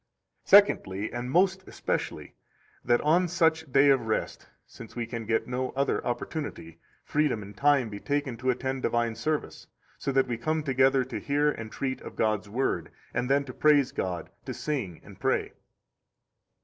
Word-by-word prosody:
84 - - -16
Secondly, 110 - +5
and 120 +1 -4
most 190 +5 +2
especially, - - -3 0.5
that 120 0 +3
on 170 +4 +3
such 160 -3 +1
day 140 +2 +6
of 130 -4 +1
rest 110 - -2 0.2
(since 115 - -12
we 120 -1 -2
can 115 -2 -6
get 110 -1 +1
no 125 +1 -2
other 140 +1 0
opportunity) 120 - -5 0.2
freedom 145 -8 0
and 100 +1 -11
time 140 -1 +3
be 100 -2 -7
taken 140 -2 -1
to 130 +2 -1
attend 130 +1 -1
divine 120 -2 0
service, 155 +6 -3 0.3
so 140 - -1
that 135 0 +3
we 120 -2 -2
come 155 +4 -1
together 135 -1 +3
to 130 - -5
hear 145 +1 +1
and 110 -5 -7
treat 130 +1 -3
of - - -9
God's 110 -1 0
Word, 130 +6 -1 0.2
and 125 - -1
then 140 +1 +3
to 130 -2 -9
praise 145 -2 +4
God, 90 -3 -4
to - - -5
sing 120 - -3
and - - -14
pray. - - 0
130 Hz, 175 wpm, -28 LUFS, 115-145 Hz, 0.5 s, day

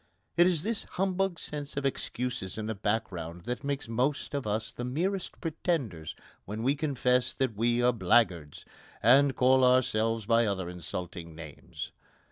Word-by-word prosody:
It 175 +1 +6
is 170 -4 +1
this 225 +1 -1
humbug 190 -1 -1
sense 145 -2 -5
of 140 - -1
excuses 125 -6 -2
in 110 - -3
the 110 - -2
background 95 -5 -2
that 125 +3 -4
makes 140 -2 -2
most 130 +7 -1
of 140 -6 -2
us 110 +1 -1
the 120 - -6
merest 175 +10 -2
pretenders 135 - -2 0.3
when 105 +3 -4
we 135 +3 +3
confess 130 -4 +1
that 130 -5 -1
we 120 +3 +2
are 125 0 +4
blackguards, 90 -7 +2 0.4
and 135 +4 +6
call 130 +1 +5
ourselves 115 -3 +3
by 115 +1 +4
other 95 -3 -2
insulting 85 -1 -6
names. 80 -3 -8
120 Hz, 155 wpm, -29 LUFS, 105-140 Hz, 0.4 s, It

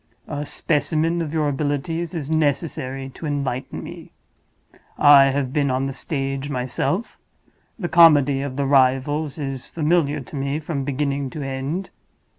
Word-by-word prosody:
A 145 -1 -4
specimen 160 +2 0
of 155 -3 -3
your 155 -2 0
abilities 150 +4 -2
is 155 -2 -4
necessary 140 -3 -1
to 155 +4 -7
enlighten 135 -3 -3
me. - - -10 0.9
I 145 -1 +8
have 135 -1 -1
been 145 -2 +1
on 130 +1 0
the 135 - -3
stage 135 0 -3
myself; 130 - -2 0.6
the 185 -7 -3
comedy 145 -5 +6
of 140 -2 -4
the 140 0 -1
Rivals 135 +3 +2
is 135 -3 -5
familiar 155 -2 +1
to 140 - -10
me 140 +2 -2
from 150 -3 -3
beginning 140 0 -1
to 145 +2 -6
end. 135 +8 -4
145 Hz, 145 wpm, -22 LUFS, 135-155 Hz, 0.9 s, I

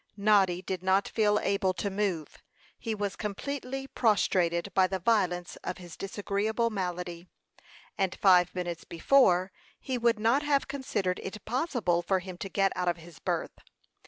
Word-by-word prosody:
Noddy 195 -3 +3
did 185 -1 -3
not 190 +1 +2
feel 210 -2 +2
able 195 -3 0
to 200 - -2
move. 190 -6 -2 0.4
He 225 -2 -3
was 205 -2 -3
completely 270 +5 -4
prostrated 195 -7 +1
by 190 -1 +4
the 190 - -2
violence 180 -3 0
of - - -5
his 175 -3 -10
disagreeable 205 +3 -1
malady; 180 -3 -4 0.7
and 190 -2 +1
five 180 -2 +4
minutes 175 -2 -4
before, 185 -1 +3 0.3
he 255 -2 -3
would 235 -1 +3
not 230 +6 +3
have 290 -2 +1
considered 205 -9 -2
it 190 +1 -7
possible 240 - 0
for 190 +2 +1
him 185 -1 -7
to 195 - -5
get 195 0 +2
out 180 0 -2
of 175 0 +1
his 165 -2 -14
berth. - - -3
195 Hz, 160 wpm, -29 LUFS, 180-220 Hz, 0.7 s, by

